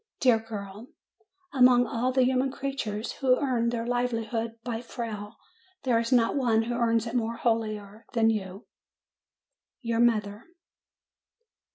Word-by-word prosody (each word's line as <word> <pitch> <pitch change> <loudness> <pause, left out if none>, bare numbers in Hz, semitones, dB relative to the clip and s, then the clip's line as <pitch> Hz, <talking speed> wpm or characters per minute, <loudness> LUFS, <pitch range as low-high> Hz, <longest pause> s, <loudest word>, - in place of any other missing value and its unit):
Dear 245 -4 +4
girl! 210 0 -8 0.7
Among 250 -2 +6
all 245 +2 -1
the 260 0 +3
human 260 +1 +1
creatures 265 -6 -4
who 255 -2 +2
earn 245 -5 0
their 230 -1 -2
livelihood 230 -2 -1
by 235 -2 -3
fail, 220 -3 -6 0.5
there 245 -3 +2
is 230 +2 -2
not 240 0 +3
one 235 -5 +2
who 240 +2 -3
earns 230 -1 +1
it 230 - -5
more 230 -2 -1
holily 225 -3 0 0.3
than 225 -2 +4
you! 195 -1 -5 1.2
YOUR 230 -2 -1
MOTHER. 215 -3 +1
230 Hz, 135 wpm, -27 LUFS, 225-250 Hz, 1.2 s, Among